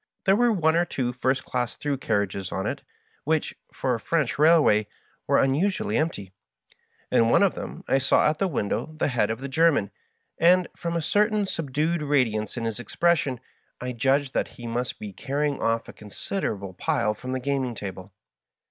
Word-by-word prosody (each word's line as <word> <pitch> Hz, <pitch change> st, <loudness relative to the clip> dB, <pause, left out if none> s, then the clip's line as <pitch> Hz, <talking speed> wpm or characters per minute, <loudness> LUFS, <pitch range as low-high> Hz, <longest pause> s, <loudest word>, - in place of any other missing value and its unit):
There 195 Hz, -, +5 dB
were 240 Hz, +2 st, +3 dB
one 160 Hz, -6 st, +2 dB
or 170 Hz, -, +4 dB
two 125 Hz, -7 st, -2 dB
first 130 Hz, +1 st, 0 dB
class 120 Hz, -2 st, -2 dB
through 145 Hz, -2 st, -2 dB
carriages 100 Hz, -5 st, -1 dB
on 95 Hz, +3 st, -2 dB
it, -, -, -3 dB, 0.4 s
which, 155 Hz, +1 st, 0 dB, 0.2 s
for 130 Hz, -, -1 dB
a 115 Hz, -, -2 dB
French 145 Hz, -2 st, -1 dB
railway, 150 Hz, -10 st, +5 dB, 0.4 s
were -, -, +4 dB
un 135 Hz, 0 st, +3 dB
usually 200 Hz, +7 st, 0 dB
empty. 125 Hz, -, -1 dB, 0.8 s
In 115 Hz, 0 st, +4 dB
one -, -, +5 dB
of 195 Hz, -, +3 dB
them 175 Hz, -, -7 dB
I 135 Hz, -, +3 dB
saw 135 Hz, -, +3 dB
at 155 Hz, +1 st, 0 dB
the 195 Hz, -, +2 dB
window 155 Hz, -, -2 dB
the 155 Hz, -, +1 dB
head 120 Hz, -5 st, +1 dB
of 115 Hz, +3 st, -3 dB
the 140 Hz, -, -4 dB
German, 140 Hz, -, +2 dB, 0.5 s
and, 180 Hz, +2 st, +5 dB
from 170 Hz, 0 st, -3 dB
a 165 Hz, -, -1 dB
certain 210 Hz, +4 st, +2 dB
subdued 160 Hz, 0 st, -1 dB
radi 140 Hz, -6 st, +2 dB
ance 110 Hz, +2 st, -4 dB
in 115 Hz, -, -2 dB
his 115 Hz, 0 st, -3 dB
expression, 140 Hz, +1 st, +1 dB, 0.4 s
I 125 Hz, 0 st, -4 dB
judged 135 Hz, +3 st, +1 dB
that -, -, 0 dB
he 120 Hz, -, -8 dB
must 120 Hz, +1 st, -3 dB
be 105 Hz, -2 st, -8 dB
carrying 145 Hz, +4 st, -2 dB
oflE 115 Hz, 0 st, 0 dB
a -, -, -9 dB
considerable 105 Hz, -, -4 dB
"pile" 120 Hz, -, 0 dB
from 130 Hz, +4 st, -6 dB
the 130 Hz, -, -1 dB
gaming 130 Hz, -2 st, -1 dB
table. 95 Hz, -2 st, -7 dB
135 Hz, 190 wpm, -25 LUFS, 115-160 Hz, 0.8 s, There